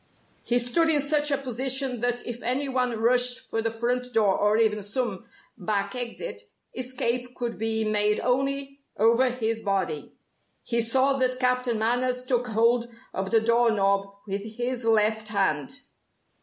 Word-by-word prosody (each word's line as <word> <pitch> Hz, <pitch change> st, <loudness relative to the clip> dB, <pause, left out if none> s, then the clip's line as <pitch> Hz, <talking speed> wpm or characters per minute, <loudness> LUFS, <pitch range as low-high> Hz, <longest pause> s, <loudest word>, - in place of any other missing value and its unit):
He 245 Hz, -, +1 dB
stood 245 Hz, +7 st, +2 dB
in 305 Hz, -2 st, +4 dB
such 295 Hz, +1 st, +2 dB
a 280 Hz, -, +2 dB
position 265 Hz, 0 st, 0 dB
that 245 Hz, +1 st, -1 dB
if 240 Hz, 0 st, -5 dB
any 260 Hz, +4 st, 0 dB
one 250 Hz, -3 st, -1 dB
rushed 245 Hz, +2 st, +3 dB
for 225 Hz, -, -3 dB
the 225 Hz, -, 0 dB
front 245 Hz, +2 st, -2 dB
door 210 Hz, -4 st, +3 dB
or 210 Hz, +1 st, +2 dB
even 215 Hz, -2 st, +2 dB
some 225 Hz, 0 st, -3 dB, 0.3 s
back 200 Hz, +1 st, -1 dB
exit, 250 Hz, -, -4 dB, 0.3 s
escape 250 Hz, -1 st, -2 dB
could 240 Hz, -3 st, -4 dB
be 220 Hz, 0 st, 0 dB
made 210 Hz, -1 st, +2 dB
only 275 Hz, +2 st, -1 dB, 0.2 s
over 230 Hz, +4 st, +4 dB
his 225 Hz, -2 st, -2 dB
body. 190 Hz, -7 st, -2 dB, 0.5 s
He 235 Hz, -1 st, 0 dB
saw 265 Hz, +4 st, +2 dB
that 255 Hz, 0 st, 0 dB
Captain 250 Hz, -2 st, +1 dB
Manners 250 Hz, +3 st, 0 dB
took 250 Hz, -1 st, 0 dB
hold 230 Hz, +2 st, +2 dB, 0.3 s
of 190 Hz, 0 st, -3 dB
the 225 Hz, +2 st, +3 dB
doorknob 220 Hz, -4 st, +2 dB, 0.2 s
with 200 Hz, 0 st, -4 dB
his 240 Hz, +3 st, -3 dB
left 220 Hz, -1 st, +2 dB
hand. 195 Hz, -9 st, 0 dB
235 Hz, 155 wpm, -26 LUFS, 220-255 Hz, 0.5 s, in